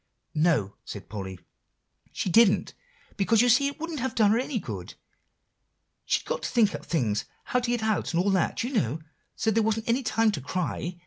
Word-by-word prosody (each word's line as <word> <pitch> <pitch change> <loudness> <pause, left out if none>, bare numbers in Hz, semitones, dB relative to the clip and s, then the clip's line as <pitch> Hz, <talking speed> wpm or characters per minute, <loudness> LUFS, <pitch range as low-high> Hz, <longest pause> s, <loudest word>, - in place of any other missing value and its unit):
"No," 150 - +1
said 100 - -9
Polly, 95 -3 -6 0.7
"she - - -3
didn't, 205 +2 +4 0.4
because 220 +3 +3
you 245 - +3
see 260 +4 +5
it 280 - -6
wouldn't 325 -2 -4
have 260 +2 -2
done 215 -1 +4
any 260 0 -2
good, 100 - -6 1.1
she'd - - 0
got - - -2
to - - -3
think 220 -4 +3
up - - -6
things, 115 -11 0 0.2
how 250 - 0
to 245 -1 -3
get 240 -2 0
out, 220 -1 0
and 175 +1 +1
all 200 - +2
that, 190 +2 +1
you 250 +4 -4
know, 160 - 0 0.4
so 220 - +1
there 225 +1 +2
wasn't 220 0 0
any 235 +3 +2
time 225 -3 +2
to 150 - -4
cry. 175 +3 -3
210 Hz, 195 wpm, -27 LUFS, 165-235 Hz, 1.1 s, see